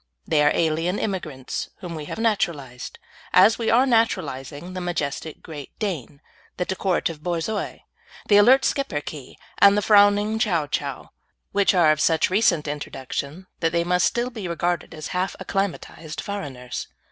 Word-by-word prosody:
They 150 Hz, -, +2 dB
are 150 Hz, -, +5 dB
alien 165 Hz, +3 st, +1 dB
immigrants 155 Hz, -10 st, -4 dB
whom 175 Hz, -2 st, -6 dB
we 155 Hz, -2 st, -6 dB
have -, -, -6 dB
naturalised, 165 Hz, -, -2 dB, 0.4 s
as 215 Hz, +5 st, +6 dB
we 230 Hz, -, 0 dB
are 245 Hz, +4 st, +5 dB
naturalising 165 Hz, -, -1 dB
the 185 Hz, -, -4 dB
majestic 160 Hz, -3 st, -3 dB
Great 145 Hz, -4 st, -9 dB
Dane, 155 Hz, -, -4 dB, 0.4 s
the 180 Hz, -, -1 dB
decorative 180 Hz, -4 st, -1 dB
Borzoi, 175 Hz, +5 st, -3 dB, 0.5 s
the 205 Hz, -, +6 dB
alert 255 Hz, +6 st, +6 dB
Schipperke, 150 Hz, -, -3 dB, 0.2 s
and 200 Hz, +1 st, +7 dB
the 210 Hz, -, +1 dB
frowning 205 Hz, +1 st, +4 dB
Chow 175 Hz, -8 st, +1 dB
Chow, 140 Hz, -1 st, -4 dB, 0.4 s
which 200 Hz, -1 st, +3 dB
are 165 Hz, -4 st, +5 dB
of 155 Hz, 0 st, 0 dB
such 165 Hz, +2 st, +2 dB
recent 185 Hz, -7 st, +2 dB
introduction 145 Hz, +3 st, -5 dB
that 165 Hz, -1 st, 0 dB
they 170 Hz, 0 st, +2 dB
must 180 Hz, +1 st, +2 dB
still 240 Hz, +1 st, -1 dB
be 215 Hz, -6 st, -6 dB
regarded 170 Hz, 0 st, -2 dB
as 155 Hz, -, -6 dB
half 185 Hz, +1 st, -1 dB
acclimatised 170 Hz, -5 st, -3 dB
foreigners. 135 Hz, -11 st, -5 dB
175 Hz, 150 wpm, -23 LUFS, 150-205 Hz, 0.5 s, and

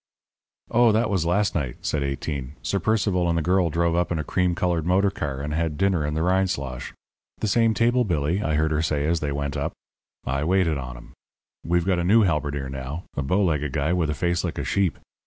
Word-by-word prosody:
"Oh, 120 Hz, 0 st, +5 dB
that 110 Hz, 0 st, +1 dB
was 90 Hz, -4 st, +1 dB
last 100 Hz, +4 st, +2 dB
night," 70 Hz, -7 st, -2 dB
said 75 Hz, -, -1 dB
Eighteen. 70 Hz, -1 st, -3 dB
"Sir 100 Hz, -, 0 dB
Percival 95 Hz, -3 st, +1 dB
and 85 Hz, -, +1 dB
the 80 Hz, -, 0 dB
girl 90 Hz, 0 st, +2 dB
drove 85 Hz, +1 st, +1 dB
up 90 Hz, 0 st, 0 dB
in 85 Hz, -, 0 dB
a 75 Hz, -, -2 dB
cream 90 Hz, +1 st, 0 dB
coloured 90 Hz, -3 st, 0 dB
motor 95 Hz, +4 st, +2 dB
car, 70 Hz, -7 st, -4 dB
and 75 Hz, +1 st, -3 dB
had 80 Hz, -2 st, -1 dB
dinner 95 Hz, -4 st, +2 dB
in 75 Hz, +1 st, -2 dB
the 80 Hz, -, 0 dB
Rindslosh. 90 Hz, -9 st, -1 dB, 0.5 s
'The 110 Hz, -, -2 dB
same 115 Hz, +2 st, +3 dB
table, 120 Hz, +2 st, +3 dB
Billy,' 85 Hz, -1 st, 0 dB
I 80 Hz, -5 st, 0 dB
heard 80 Hz, +1 st, +1 dB
her 75 Hz, 0 st, +1 dB
say 75 Hz, -2 st, 0 dB
as 85 Hz, +2 st, +1 dB
they 75 Hz, -1 st, -2 dB
went 70 Hz, 0 st, -3 dB
up. -, -, -2 dB, 0.5 s
I 70 Hz, +2 st, -1 dB
waited 85 Hz, -3 st, +2 dB
on 65 Hz, -2 st, -7 dB
'em. -, -, -14 dB, 0.5 s
We've 85 Hz, 0 st, +1 dB
got 95 Hz, -2 st, +2 dB
a -, -, 0 dB
new 110 Hz, +5 st, +5 dB
halberdier 75 Hz, -6 st, -1 dB
now, 65 Hz, +5 st, -5 dB
a -, -, -1 dB
bow 90 Hz, +9 st, +1 dB
legged 75 Hz, -6 st, 0 dB
guy 75 Hz, +4 st, +1 dB
with 85 Hz, -4 st, +1 dB
a 75 Hz, -, -1 dB
face 85 Hz, +2 st, 0 dB
like -, -, -3 dB
a -, -, -2 dB
sheep. 95 Hz, -4 st, 0 dB
85 Hz, 230 wpm, -24 LUFS, 75-95 Hz, 0.5 s, Oh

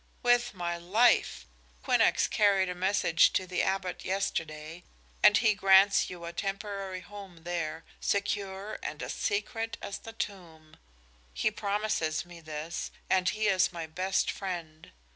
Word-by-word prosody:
"With 245 Hz, -1 st, +3 dB
my 175 Hz, -1 st, -2 dB
life! 215 Hz, +8 st, +2 dB, 0.4 s
Quinnox -, -, +3 dB
carried 195 Hz, -3 st, +3 dB
a -, -, -2 dB
message 180 Hz, -2 st, +3 dB
to 185 Hz, -, +1 dB
the 180 Hz, 0 st, -1 dB
Abbot 190 Hz, -1 st, -2 dB
yesterday, 165 Hz, -3 st, -3 dB, 0.4 s
and 210 Hz, 0 st, +7 dB
he 220 Hz, -1 st, +4 dB
grants 195 Hz, 0 st, +5 dB
you 175 Hz, -2 st, -8 dB
a 170 Hz, -, -6 dB
temporary 195 Hz, 0 st, -4 dB
home 195 Hz, -4 st, -11 dB
there, 165 Hz, -2 st, -3 dB, 0.2 s
secure 200 Hz, 0 st, -2 dB
and 150 Hz, -, -5 dB
as -, -, -4 dB
secret 225 Hz, +2 st, -2 dB
as 195 Hz, -, -6 dB
the 225 Hz, -, -10 dB
tomb. 170 Hz, -8 st, -7 dB, 0.6 s
He 215 Hz, -, +1 dB
promises 200 Hz, -7 st, -1 dB
me 175 Hz, -1 st, -12 dB
this, 155 Hz, +1 st, -5 dB, 0.2 s
and 185 Hz, -1 st, +3 dB
he 215 Hz, 0 st, -1 dB
is 190 Hz, -2 st, +3 dB
my 170 Hz, -2 st, -5 dB
best 185 Hz, +4 st, 0 dB
friend. 170 Hz, -5 st, -6 dB
190 Hz, 140 wpm, -29 LUFS, 170-205 Hz, 0.6 s, and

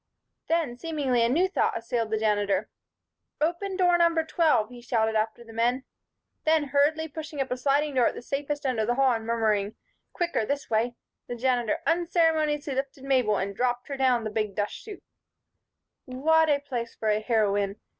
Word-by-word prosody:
Then, 315 Hz, -8 st, 0 dB
seemingly, 285 Hz, -7 st, 0 dB
a 230 Hz, -, +2 dB
new 340 Hz, +9 st, +3 dB
thought 380 Hz, -, 0 dB
assailed 230 Hz, -1 st, -2 dB
the 220 Hz, -, 0 dB
Janitor. 205 Hz, -2 st, 0 dB, 0.7 s
"Open 350 Hz, +5 st, -1 dB
door 355 Hz, -2 st, +4 dB
number 335 Hz, -1 st, +3 dB
twelve," 315 Hz, -10 st, +2 dB
he 245 Hz, -1 st, -11 dB
shouted 225 Hz, -2 st, 0 dB
after 220 Hz, +2 st, -1 dB
the 225 Hz, -1 st, -13 dB
men. 240 Hz, +3 st, +1 dB, 0.6 s
Then, 310 Hz, -2 st, +2 dB
hurriedly 305 Hz, +3 st, +2 dB
pushing 310 Hz, -1 st, -8 dB
up 265 Hz, -1 st, -2 dB
a -, -, +1 dB
sliding 285 Hz, +3 st, +1 dB
door 250 Hz, -3 st, +3 dB
at -, -, -2 dB
the -, -, -8 dB
safest 285 Hz, +2 st, -3 dB
end 255 Hz, -4 st, 0 dB
of 215 Hz, -, 0 dB
the 240 Hz, -, +1 dB
hall 270 Hz, 0 st, +4 dB
and 225 Hz, -1 st, -2 dB
murmuring 215 Hz, -3 st, 0 dB, 0.4 s
"Quicker 345 Hz, -, -1 dB
this 280 Hz, +4 st, -3 dB
way," 230 Hz, +2 st, +1 dB, 0.3 s
the 245 Hz, -, -4 dB
Janitor 250 Hz, +5 st, 0 dB
unceremoniously 320 Hz, -4 st, +1 dB
lifted 270 Hz, 0 st, -4 dB
Mabel 255 Hz, -6 st, +2 dB
and 195 Hz, +1 st, -3 dB
dropped 245 Hz, +2 st, -1 dB
her 280 Hz, -, -3 dB
down 255 Hz, -3 st, +2 dB
the 215 Hz, -, -4 dB
big 215 Hz, -2 st, -2 dB
dust 205 Hz, -1 st, -1 dB
chute. 420 Hz, -1 st, -10 dB, 1.0 s
What 315 Hz, +5 st, +2 dB
a 290 Hz, -, +4 dB
place 250 Hz, -5 st, -5 dB
for 220 Hz, -, -2 dB
a 210 Hz, 0 st, +2 dB
heroine! 205 Hz, -3 st, +1 dB
255 Hz, 185 wpm, -27 LUFS, 225-305 Hz, 1.0 s, door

